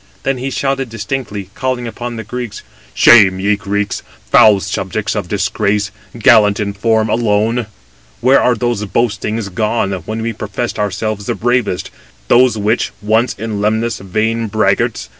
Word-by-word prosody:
Then 135 Hz, -2 st, -1 dB
he 130 Hz, +2 st, -3 dB
shouted 135 Hz, -1 st, -1 dB
distinctly, 105 Hz, -3 st, -5 dB
calling 130 Hz, 0 st, -2 dB
upon 120 Hz, +1 st, -6 dB
the 110 Hz, -, -5 dB
Greeks: 115 Hz, -1 st, -6 dB, 0.3 s
"Shame! 100 Hz, -5 st, +6 dB
ye 100 Hz, +2 st, +2 dB
Greeks, 100 Hz, 0 st, -2 dB, 0.3 s
foul 105 Hz, -2 st, +6 dB
subjects 95 Hz, +2 st, -3 dB
of 105 Hz, -4 st, -3 dB
disgrace! 105 Hz, +1 st, 0 dB, 0.3 s
gallant 110 Hz, -3 st, +5 dB
in 100 Hz, -1 st, -2 dB
form 110 Hz, +1 st, +1 dB
[alone]! 110 Hz, +1 st, +1 dB, 0.5 s
Where 130 Hz, +4 st, +4 dB
are 125 Hz, -, +3 dB
those 120 Hz, -1 st, -1 dB
boastings 110 Hz, 0 st, -1 dB
gone, 105 Hz, +1 st, -1 dB, 0.2 s
when 110 Hz, +1 st, -3 dB
we 115 Hz, 0 st, -2 dB
professed 110 Hz, +3 st, -4 dB
ourselves 105 Hz, 0 st, -2 dB
the -, -, -1 dB
bravest; 120 Hz, -6 st, -1 dB, 0.4 s
those 125 Hz, -2 st, +4 dB
which, 105 Hz, +3 st, 0 dB
once 110 Hz, +4 st, +1 dB
in 105 Hz, -1 st, -4 dB
Lemnos, 110 Hz, +3 st, 0 dB
vain 110 Hz, +4 st, -1 dB
braggarts! 100 Hz, -, 0 dB
110 Hz, 145 wpm, -16 LUFS, 105-120 Hz, 0.5 s, Shame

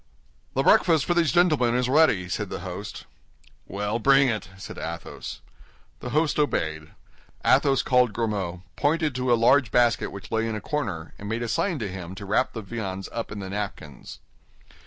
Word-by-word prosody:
"The -, -, +2 dB
breakfast 160 Hz, -6 st, +4 dB
for 175 Hz, -, +1 dB
these 170 Hz, -4 st, +2 dB
gentlemen 155 Hz, -9 st, +3 dB
is 125 Hz, 0 st, +1 dB
ready," 130 Hz, -, +3 dB
said 100 Hz, +2 st, -3 dB
the -, -, -5 dB
host. 95 Hz, +3 st, -7 dB, 0.6 s
"Well, 105 Hz, +3 st, -2 dB
bring 135 Hz, +2 st, +5 dB
it," 110 Hz, -6 st, -3 dB
said 95 Hz, -, -8 dB
Athos. 85 Hz, +1 st, -6 dB, 0.6 s
The -, -, -6 dB
host 155 Hz, 0 st, +1 dB
obeyed. 80 Hz, -, -1 dB, 0.6 s
Athos 135 Hz, -2 st, +4 dB
called 125 Hz, -2 st, +3 dB
Grimaud, 100 Hz, -5 st, -3 dB
pointed 155 Hz, -, +1 dB
to 125 Hz, 0 st, -1 dB
a -, -, +7 dB
large 130 Hz, +2 st, +4 dB
basket 120 Hz, 0 st, +2 dB
which 100 Hz, -1 st, -10 dB
lay 110 Hz, 0 st, 0 dB
in 110 Hz, -, -3 dB
a -, -, -3 dB
corner, 100 Hz, -, -4 dB
and 100 Hz, -, -6 dB
made 115 Hz, +2 st, -2 dB
a -, -, -2 dB
sign 165 Hz, -, 0 dB
to 110 Hz, -6 st, -3 dB
him 90 Hz, -1 st, -7 dB
to 100 Hz, -, -8 dB
wrap 105 Hz, +6 st, +1 dB
the 110 Hz, -, -6 dB
viands 95 Hz, -3 st, -5 dB
up 115 Hz, -2 st, -5 dB
in 105 Hz, -, -6 dB
the 95 Hz, -, -6 dB
napkins. 100 Hz, -8 st, -6 dB
115 Hz, 180 wpm, -25 LUFS, 95-135 Hz, 0.6 s, a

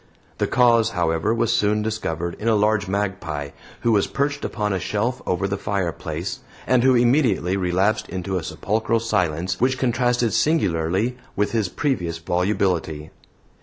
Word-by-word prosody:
The -, -, +1 dB
cause, 120 Hz, -2 st, +4 dB
however, 80 Hz, +3 st, +1 dB
was 115 Hz, 0 st, +1 dB
soon 105 Hz, +1 st, +1 dB
discovered 85 Hz, -6 st, -3 dB
in 110 Hz, -, -3 dB
a 115 Hz, -, +4 dB
large 105 Hz, -1 st, +2 dB
magpie 95 Hz, -7 st, -2 dB, 0.3 s
who 120 Hz, -, +2 dB
was 105 Hz, -3 st, +3 dB
perched 140 Hz, +1 st, -2 dB
upon 105 Hz, -3 st, -1 dB
a 95 Hz, -, -1 dB
shelf 110 Hz, +7 st, -2 dB
over 90 Hz, +2 st, 0 dB
the 100 Hz, 0 st, -3 dB
fireplace, 95 Hz, -6 st, -3 dB, 0.3 s
and 130 Hz, -1 st, +3 dB
who 130 Hz, -1 st, +5 dB
immediately 120 Hz, -, +2 dB
relapsed 100 Hz, +4 st, 0 dB
into 95 Hz, +1 st, -3 dB
a 85 Hz, -, -3 dB
sepulchral 110 Hz, +5 st, -1 dB
silence 90 Hz, -5 st, -1 dB
which 130 Hz, +1 st, +2 dB
contrasted 120 Hz, -2 st, +1 dB
singularly 100 Hz, -, +1 dB, 0.2 s
with 105 Hz, +1 st, 0 dB
his 110 Hz, -5 st, 0 dB
previous 90 Hz, -, -1 dB
volubility. 85 Hz, -3 st, -1 dB
105 Hz, 150 wpm, -22 LUFS, 90-115 Hz, 0.3 s, who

